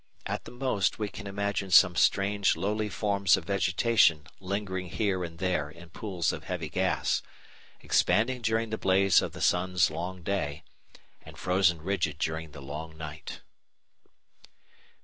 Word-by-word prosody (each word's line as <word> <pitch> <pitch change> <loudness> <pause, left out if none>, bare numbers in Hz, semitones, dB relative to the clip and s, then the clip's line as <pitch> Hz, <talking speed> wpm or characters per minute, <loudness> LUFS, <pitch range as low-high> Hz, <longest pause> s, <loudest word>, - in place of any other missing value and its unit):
At - - -4
the - - -9
most 125 -5 0
we 105 -2 -2
can 105 +1 -8
imagine 100 0 -2
some 90 0 +6
strange 100 +2 +2
lowly 105 +2 -1
forms 100 -2 +2
of 90 - -7
vegetation 90 -3 +3
lingering 95 -1 -3
here 95 -2 -1
and 85 -1 -7
there 90 -5 -1
in 85 +2 -14
pools 90 -3 -2
of - - -7
heavy - - -4
gas, - - 0 0.6
expanding 125 +4 +2
during 110 0 0
the 110 - -3
blaze 95 -1 +4
of - - -4
the - - -9
sun's 90 -1 +2
long 90 +3 -5
day, 80 -6 -2 0.6
and - - -13
frozen 90 -3 +2
rigid 85 -6 -1
during 80 0 -3
the 70 -1 -11
long 80 +3 -7
night. 80 -1 -8
95 Hz, 150 wpm, -28 LUFS, 85-100 Hz, 0.6 s, some